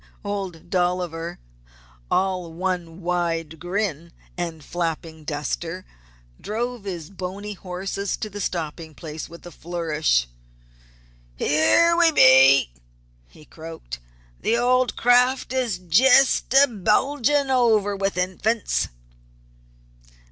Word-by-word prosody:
Old 190 -4 -5
Dolliver, 175 -2 -1 0.7
all 185 -3 0
one 175 0 -4
wide 165 -3 -2
grin 175 -2 -3 0.2
and 165 -3 -5
flapping 165 -2 -4
duster, 165 +4 -4 0.6
drove 235 0 -4
his 175 -4 -6
bony 195 +2 -6
horses 190 +2 -4
to - - -4
the 205 0 -7
stopping 160 -3 -4
place 155 -1 -7
with 170 +1 -13
a 175 - -9
flourish. 155 - -1 1.1
"Here 160 - +3
we 335 -1 +5
be!" 130 - +6 0.5
he 150 - -18
croaked. 160 - -9 0.4
"The 230 - +1
old 250 +1 +2
craft 250 +2 +3
is 245 -7 0
jest 250 +12 +4
a 275 +2 +7
bulgin' 270 +6 +1
over 220 -5 +3
with 195 -1 -2
Infants." 190 +5 0
180 Hz, 105 wpm, -23 LUFS, 165-215 Hz, 1.1 s, a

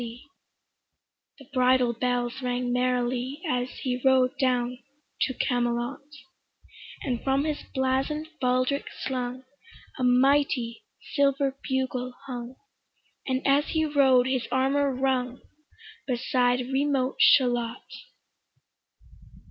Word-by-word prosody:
The 275 - -14
bridle 255 -1 +3
bells 245 +1 -1
rang 245 -1 -1
merrily 250 +2 0
As 250 -3 -1
he 250 -1 -2
rode 260 -1 +4
down 250 -1 0 0.5
to 260 - -4
Camelot: 240 +1 -1 1.0
And 245 -4 -2
from 270 +1 +1
his 305 -2 -2
blazon'd 270 +4 0
baldric 255 +2 +1 0.2
slung 255 -1 -3 0.6
A - - -1
mighty 250 -1 +2 0.3
silver 275 -1 +2
bugle 255 -1 -2
hung, 245 -1 -6 0.7
And 260 0 -1
as 280 +2 +3
he 315 -1 0
rode 270 -4 +4
his 260 -2 -1
armour 270 +2 +2
rung, 255 -1 -1 0.7
Beside 250 0 +1
remote 275 -1 0
Shalott. 240 -2 +4
255 Hz, 100 wpm, -26 LUFS, 245-270 Hz, 1.0 s, rode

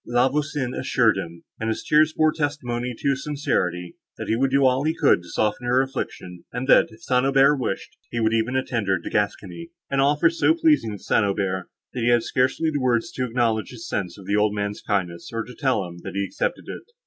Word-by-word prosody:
La 120 +2 +3
Voisin 140 -2 -2
assured 120 -3 +2
him, 85 -3 -6 0.2
and 110 - -2
his 110 - -3
tears 155 +1 +4
bore 155 0 +3
testimony 125 -6 -3
to - - -1
his 135 0 -3
sincerity, 90 - -2 0.2
that - - -5
he 110 - +1
would 135 +3 +1
do 135 +1 +3
all 130 +1 +3
he 160 +2 0
could 145 - +3
to 85 - -14
soften 110 +3 -1
her 125 +1 +3
affliction, 90 -9 -4
and 125 +2 -4
that, - - +6
if 110 - -17
St. 125 -1 +2
Aubert 135 +1 +4
wished 125 -7 -3
it, - - -35
he - - 0
would 110 0 +2
even 115 +3 0
attend 120 -5 -1
her 95 - +3
into 85 - -6
Gascony; 105 - -2 0.2
an 140 - +1
offer 150 +4 +3
so 175 - +2
pleasing 315 - +2
to - - -6
St. - - +2
Aubert, 95 -2 -1 0.2
that 125 - -4
he 115 - +2
had 120 -1 +4
scarcely 130 +5 +1
words 125 -4 +1
to 130 - -2
acknowledge 115 -3 0
his 115 -2 -9
sense 95 -1 -3
of 100 - -12
the 100 +1 0
old 105 0 +2
man's 105 0 -3
kindness, 90 -4 -2
or 115 0 -2
to 125 +3 -11
tell 130 -9 0
him, 85 0 -10
that 95 +2 -8
he 100 - 0
accepted 95 - -3
it. - - -6
120 Hz, 230 wpm, -23 LUFS, 105-135 Hz, 0.2 s, that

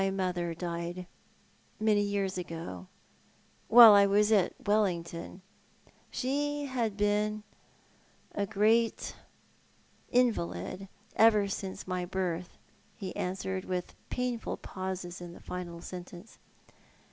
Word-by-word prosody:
'• - - +2
My 195 - +2
mother 180 -3 -2
died 175 +1 -4 0.7
many 215 -1 +3
years 200 -2 -1
ago, 165 - -6 0.8
while 230 -1 +11
I 200 0 +7
was 210 +2 +3
at 200 -5 +3
Wellington. 180 -3 -1 0.7
She 290 +2 -1
had 235 -6 -2
been 210 +1 +1 0.4
— - - -33
a 200 - 0
great 220 +3 +2 0.9
invalid— 195 - 0 0.3
ever 215 -2 +5
since 195 -1 -5
my 180 -1 -2
birth." 180 -1 -3 0.4
he 190 -4 -6
answered, 190 +1 -3
with 180 -1 -3 0.2
painful 250 -2 -2
pauses 185 -2 -5
in 175 -1 -8
the - - -12
final 175 -2 -6
sentence. 180 +3 -10
190 Hz, 110 wpm, -30 LUFS, 175-215 Hz, 0.9 s, while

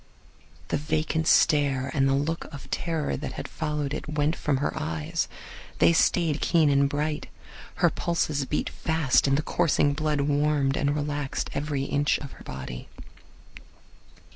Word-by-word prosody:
The - - +1
vacant 155 +1 -1
stare 140 -4 +3
and 135 -1 +2
the 135 - +3
look 160 +4 -1
of 140 -2 -10
terror 160 - -1
that - - -5
had - - -6
followed 150 -3 -3
it 155 - -5
went 150 +2 +1
from 150 -5 0
her 140 - -1
eyes. 80 -1 -2 0.5
They 170 - +5
stayed 165 -2 +2
keen 160 -4 +3
and 140 0 +3
bright. 150 +1 -2 0.5
Her - - +3
pulses 155 -4 -1
beat 150 - -2
fast, 160 -5 +2
and 135 0 +3
the 150 - -1
coursing 145 -4 +2
blood 150 -1 0
warmed 145 -1 +1
and 145 +1 +1
relaxed 145 -1 -2
every 140 -1 -2
inch 145 +1 +1
of 140 -2 -8
her - - -13
body. 65 -2 -7
145 Hz, 155 wpm, -26 LUFS, 140-155 Hz, 0.5 s, They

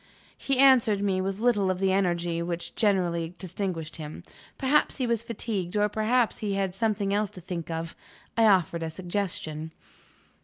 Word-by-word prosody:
He 275 -1 -1
answered 245 -7 +5
me 190 -2 +1
with 195 0 -2
little 215 -4 +2
of 185 - 0
the 190 0 +2
energy 175 -3 +1
which 170 0 -4
generally 175 -5 +1
distinguished 180 -4 -4
him. 155 -1 -8 0.3
Perhaps 285 +2 +2
he 260 - 0
was 235 -2 +1
fatigued, 215 -5 -3
or 210 0 +4
perhaps 220 +3 +1
he 205 -2 -1
had 195 -2 -1
something 200 0 0
else 205 0 +1
to - - -10
think 170 -1 -5
of. 165 0 -4 0.4
I 230 - +4
offered 175 -4 +3
a 165 - -2
suggestion. 170 -3 -4
195 Hz, 165 wpm, -27 LUFS, 170-215 Hz, 0.4 s, answered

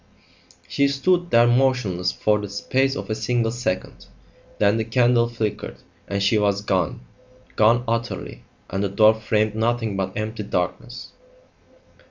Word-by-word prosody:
She 140 - +1
stood 175 +6 +1
there 115 -4 +5
motionless 120 -8 +1
for 105 0 +1
the 105 -1 -6
space 135 +7 0
of - - -5
a - - +2
single 115 +1 0
second. 120 -6 -4 0.5
Then 105 +2 +3
the 110 - 0
candle 120 0 +2
flickered 110 -3 -4 0.3
and 100 0 -2
she 105 +2 +3
was 100 -1 +1
gone 95 -2 -1 0.5
gone 115 +3 +4
utterly 115 +1 -3 0.3
and 95 +2 -1
the 100 - 0
door 110 +3 +5
framed 110 -1 0
nothing 115 -1 -1
but 95 -1 -3
empty 110 +1 -4
darkness. 105 +5 -4
110 Hz, 145 wpm, -22 LUFS, 100-120 Hz, 0.5 s, there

